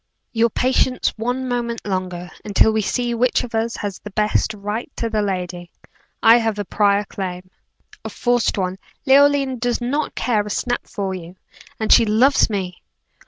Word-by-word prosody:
"Your 230 0 +3
patience 255 +2 +1
one 245 +3 -2
moment 240 -2 -3
longer, 185 -2 -4
until 210 +1 +3
we 220 0 +1
see 240 +3 -1
which 245 +2 +1
of 245 - -8
us 225 +1 -1
has 205 -3 -5
the 210 - -9
best 210 +1 +1
right 210 +6 -5
to 230 -1 -3
the 215 -1 +1
lady. 180 -3 -3 0.5
I 225 +1 +8
have 225 -3 -1
a 205 - -3
prior 205 +1 +2
claim." 185 -2 -6 0.5
"A - - -5
forced 245 -2 0
one. 185 0 -2 0.3
Leoline 275 -1 +4
does 245 0 0
not 275 +5 -2
care 225 -4 +1
a 210 - -6
snap 245 +3 -2
far 195 -2 -3
you 180 -1 -8 0.4
and 220 - +4
she 235 - +7
loves 235 +7 +3
me." 185 -4 -4
220 Hz, 170 wpm, -20 LUFS, 195-245 Hz, 0.5 s, I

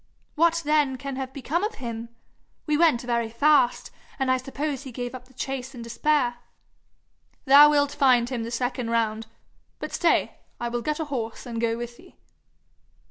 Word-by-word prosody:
'What 335 +1 +2
then 295 -3 +2
can 275 0 -5
have 265 -1 -4
become 290 +7 -2
of 430 +1 -2
him? 230 -2 -6 0.6
We 300 -3 +1
went 310 -6 +4
very 235 -2 -1
fast, 250 +1 +2 0.3
and 265 -2 +1
I 260 - +3
suppose 275 +2 -4
he 270 -3 -9
gave 245 +1 -5
up 255 -1 -9
the 260 - -22
chase 265 0 -5
in 235 - -7
despair.' 245 +1 0 1.1
'Thou 285 +2 +9
wilt 285 -1 +2
find 255 -5 +3
him 245 -2 -3
the 225 - -4
second 245 0 -2
round. 225 -1 0 0.5
But - - -6
stay 340 - +1 0.2
I 240 - -2
will 240 0 -2
get 300 +5 -2
a 320 - -2
horse 235 -6 -5
and 230 -2 -4
go 230 -1 0
with 240 0 -7
thee.' 365 - -18
260 Hz, 180 wpm, -25 LUFS, 235-290 Hz, 1.1 s, Thou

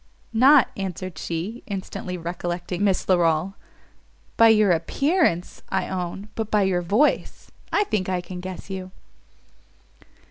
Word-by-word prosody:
"Not," 260 +3 +6
answered 185 -3 -5
she, 180 +9 -4
instantly 185 -2 -5
recollecting 175 +2 -4
Miss 195 -2 +1
Larolles, 175 0 +2 0.8
"by 230 - +7
your 215 -3 +5
appearance, 185 - +1
I 190 - -1
own! 190 +2 -4
but 220 -2 -3
by 210 -2 +3
your 185 -2 +1
voice, 210 - 0 0.2
I 415 - +3
think 205 - -2
I 185 -1 0
can 180 0 -7
guess 185 0 -7
you." 190 -1 -6
190 Hz, 130 wpm, -24 LUFS, 175-215 Hz, 0.8 s, by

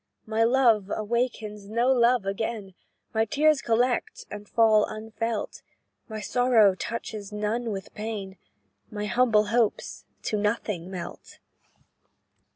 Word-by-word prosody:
"My 220 +1 +1
love 230 -5 +3
awakes 235 +2 -1 0.2
no 235 +5 +1
love 245 -3 +3
again, 200 0 -3 0.4
My 220 0 +3
tears 295 +5 +3
collect, 240 +2 0
and 210 0 -8
fall 220 -2 +5
unfelt; 220 0 -4 0.5
My 220 0 -5
sorrow 230 -3 +4
touches 215 0 -5
none 215 +3 -2
with 195 -2 -6
pain, 210 -3 -5 0.5
My 210 0 -4
humble 220 -2 +3
hopes 235 -3 0 0.2
to 215 - -1
nothing 205 -4 -2
melt. 180 -3 -8
220 Hz, 115 wpm, -26 LUFS, 210-235 Hz, 0.5 s, fall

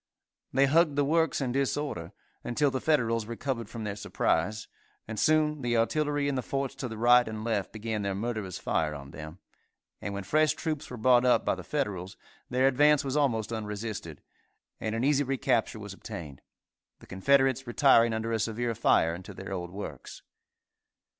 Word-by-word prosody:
They 135 +1 +4
hugged 155 +1 +3
the 145 0 +2
works 160 +1 +1
in 130 -2 -1
disorder, 135 - -2 0.3
until 140 +4 +1
the 130 - -2
Federals 115 -8 +1
recovered 115 -1 -4
from 115 -1 -6
their 105 -2 -3
surprise, 110 +1 -1 0.4
and 110 -1 -4
soon 155 -1 +2
the 120 -2 +1
artillery 145 +4 +1
in 140 - 0
the 130 - -1
forts 135 +1 -3
to 130 - -3
the 110 -2 -7
right 120 +1 +5
and 110 -1 -5
left 110 -4 -1
began 110 -1 -3
their 100 -1 -2
murderous 105 -4 -3
fire 80 -4 -1
on 70 -1 -9
them, 80 +3 -9 0.6
and 100 -1 -4
when 100 - -4
fresh 155 +7 +3
troops 155 -1 -4
were 125 - -7
brought 120 +2 +4
up 125 -1 +3
by - - +2
the - - -7
Federals, 100 -10 -3 0.3
their 130 +1 +2
advance 145 +2 +4
was 135 0 -2
almost 115 -7 +1
unresisted, 105 -7 -5 0.6
and 110 0 -2
an 115 - -1
easy 145 +1 +3
recapture 125 -4 0
was 105 -2 -8
obtained, 85 - -8 0.6
the - - -16
Confederates 135 +5 +2
retiring 120 -2 +5
under 110 +1 -2
a 115 - 0
severe 115 +2 -1
fire 85 -5 +3
into 90 +2 -9
their 95 0 -6
old 90 -2 -4
works. 90 -8 -8
115 Hz, 180 wpm, -29 LUFS, 105-140 Hz, 0.6 s, right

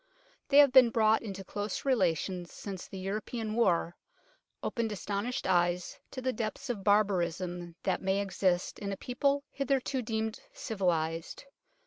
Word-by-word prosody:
They 280 - +5
have 285 -2 +8
been 255 -2 +8
brought 220 -1 +3
into 195 -3 -6
close 205 +2 -4
rela 195 - +3
tion 180 0 -4
since 190 +1 -7
the 195 - -8
European 215 +3 -3
War 175 -6 +2 0.7
opened 230 -3 -1
astonished 205 +4 -3
eyes 175 0 +1
to 255 - -7
the 255 0 0
depths 235 +4 -3
of 205 -5 -6
barbarism 180 -4 +1
that - - 0
may 190 +1 +1
exist 185 -2 0
in 200 -1 -3
a 195 - -4
people 280 +5 0
hitherto 275 -1 0
deemed 220 -1 -2
civilized. 165 - -2
205 Hz, 145 wpm, -31 LUFS, 180-235 Hz, 0.7 s, have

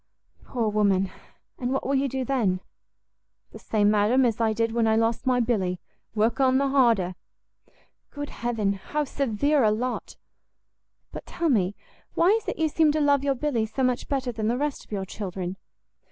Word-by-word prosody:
"Poor 235 -3 -1
woman! 200 -3 +2 0.5
and 245 0 -2
what 270 - -1
will 275 - 0
you 275 0 +2
do 265 0 -3
then?" 225 -9 +1 0.9
"The - - -11
same, 210 -1 +2
madam, 215 +5 +3
as 230 -1 0
I 225 -1 +3
did 225 +1 0
when 230 -1 +1
I 220 - +3
lost 225 +3 0
my 250 -1 +3
Billy, 195 -7 0 0.4
work 220 +4 +1
on 260 -1 +4
the 275 0 +1
harder!" 230 -9 +3 1.0
"Good 290 0 -6
heaven, 225 -4 -1
how 295 +10 -3
severe 275 +1 +1
a 215 - +5
lot! 245 +4 -3 0.9
but - - -9
tell 340 -1 -1
me, 205 -6 +1 0.4
why 340 - +4
is 445 +2 +2
it - - -3
you 320 - +2
seem 310 0 +3
to 310 - 0
love 285 -2 +3
your 275 -1 +1
Billy 245 -5 -1
so 260 +5 -3
much 250 -1 0
better 265 -3 -1
than 220 -2 -3
the 240 +2 +1
rest 290 +1 -2
of - - -24
your 195 -2 -2
children?" 185 -2 -5
235 Hz, 185 wpm, -25 LUFS, 210-275 Hz, 1.0 s, a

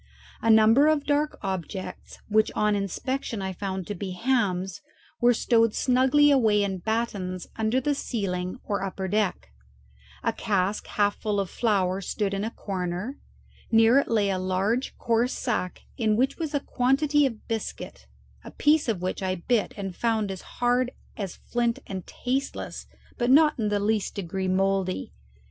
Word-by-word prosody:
A 225 - +1
number 225 +6 +6
of 310 -2 +3
dark 295 +1 +1
objects, 190 0 -5
which 215 0 +3
on 210 0 +2
inspection 225 +4 -3
I 190 -1 -3
found 190 0 -4
to 205 - -4
be 190 -1 -5
hams, 195 -5 0 0.4
were 240 0 +5
stowed 230 -1 +2
snugly 265 +3 +4
away 220 -7 +4
in 190 -2 -2
battens 200 -4 -2
under 220 +3 +1
the 290 +3 0
ceiling 185 -9 -3
or 200 - -2
upper 190 0 -3
deck; 200 - -1 0.7
a - - +1
cask 200 -2 -1
half 205 -1 +1
full 210 -2 -1
of 195 -3 -2
flour 195 -4 +1
stood 200 +1 -2
in 195 +1 -1
a 220 - -1
corner; 190 +4 -4 0.5
near 225 +3 +6
it - - -1
lay 210 -4 +2
a 185 - -1
large 190 +7 -1
coarse 235 +2 +1
sack 185 -7 -2
in 220 -4 +2
which 260 +8 +1
was 315 -3 -2
a - - +3
quantity 280 +3 +2
of 230 -4 -9
biscuit, 215 - -5 0.4
a - - -9
piece 295 -3 +2
of 190 -5 -1
which 185 - -2
I 185 -1 0
bit 210 +5 0
and 195 -3 -5
found 220 -3 0
it - - -2
as 185 - -9 0.2
hard 245 +1 +2 0.2
as 195 -4 -5
flint 235 -1 -1
and 190 -2 -6
tasteless, 265 +2 -3 0.3
but 240 0 +1
not 300 +1 +5
in 215 -2 +1
the 205 0 +1
least 210 0 0
degree 190 -1 -3
mouldy. 190 - 0
215 Hz, 165 wpm, -26 LUFS, 190-245 Hz, 0.7 s, number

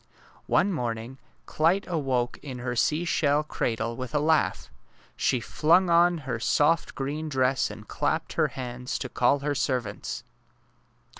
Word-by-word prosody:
One 200 - +3
morning 120 -2 -4 0.3
Clyte 170 +6 +1
awoke 135 -8 -1
in 130 -3 -7
her 125 0 -3
seashell 150 +1 +2
cradle 115 -5 -2
with 130 +4 -6
a - - +4
laugh. 155 +1 +1 0.4
She 130 - +1
flung 170 +8 +3
on 175 +1 +5
her 120 -3 -2
soft 150 +6 +2
green 150 +3 -3
dress 130 -2 +1
and - - -10
clapped - - -1
her - - +2
hands 125 -1 -5
to 130 - -5
call 130 +4 +2
her 145 0 0
servants. 125 -6 -2
135 Hz, 140 wpm, -27 LUFS, 125-155 Hz, 0.4 s, on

